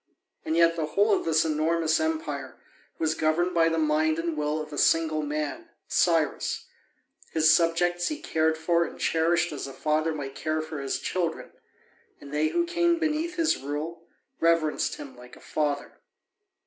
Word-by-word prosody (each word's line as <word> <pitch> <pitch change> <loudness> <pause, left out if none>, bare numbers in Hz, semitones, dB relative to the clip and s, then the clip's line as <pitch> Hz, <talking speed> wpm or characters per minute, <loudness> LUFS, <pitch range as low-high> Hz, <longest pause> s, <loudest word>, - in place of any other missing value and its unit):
And 160 - -1
yet 170 0 +5
the 160 -2 -2
whole 205 +6 +2
of - - 0
this 160 -1 +3
enormous 160 +1 +1
empire 320 0 -3 0.4
was 160 -1 +1
governed 160 +3 +1
by 165 -1 +4
the 165 - -1
mind 155 0 +2
and 165 -1 -2
will 150 +1 -1
of 155 -1 -7
a - - -5
single 160 -1 +3
man, 150 - -4 0.2
Cyrus: 165 -4 +1 0.7
his 160 0 +5
subjects 175 +1 +2
he 305 -1 -3
cared 160 - 0
for 170 +1 +2
and - - -7
cherished 165 +1 +1
as 145 -2 -5
a 135 - -8
father 155 +3 0
might 140 -3 -5
care 155 +2 -2
for 155 -1 -6
his 135 - -2
children, 170 -3 -3 0.7
and 140 0 -11
they 150 +1 +2
who 345 - 0
came 345 0 +2
beneath 320 +2 -1
his 330 -2 +2
rule 155 +5 -5 0.3
reverenced 165 -2 +2
him 135 -3 -10
like 125 0 -14
a - - -16
father. 145 -2 -3
160 Hz, 170 wpm, -27 LUFS, 155-170 Hz, 0.7 s, yet